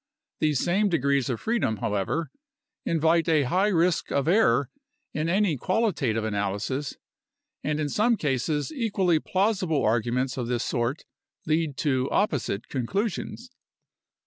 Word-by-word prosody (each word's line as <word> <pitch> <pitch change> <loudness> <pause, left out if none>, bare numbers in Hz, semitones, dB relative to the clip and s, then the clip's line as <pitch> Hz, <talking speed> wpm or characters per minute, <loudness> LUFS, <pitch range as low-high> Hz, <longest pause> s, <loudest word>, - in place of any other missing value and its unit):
These 150 -4 +2
same 200 +4 +2
degrees 140 -5 +1
of 120 - -2
freedom, 220 - 0
however, 105 - -2 0.6
invite 165 0 +2
a 155 -3 +4
high 185 +10 +2
risk 175 -3 +1
of 140 +1 0
error 140 - +3 0.4
in 155 +2 -1
any 190 -4 +2
qualitative 145 - 0
analysis, 110 +6 -2 0.7
and 150 0 -1
in 150 - 0
some 220 - +2
cases 145 - -1
equally 200 - +1
plausible 190 -5 0
arguments 120 +4 0
of 120 -2 -2
this 120 -1 -1
sort 120 +4 -2 0.4
lead 155 -3 0
to 130 -3 0
opposite 145 - 0
conclusions. 195 - -3
155 Hz, 125 wpm, -26 LUFS, 125-185 Hz, 0.7 s, a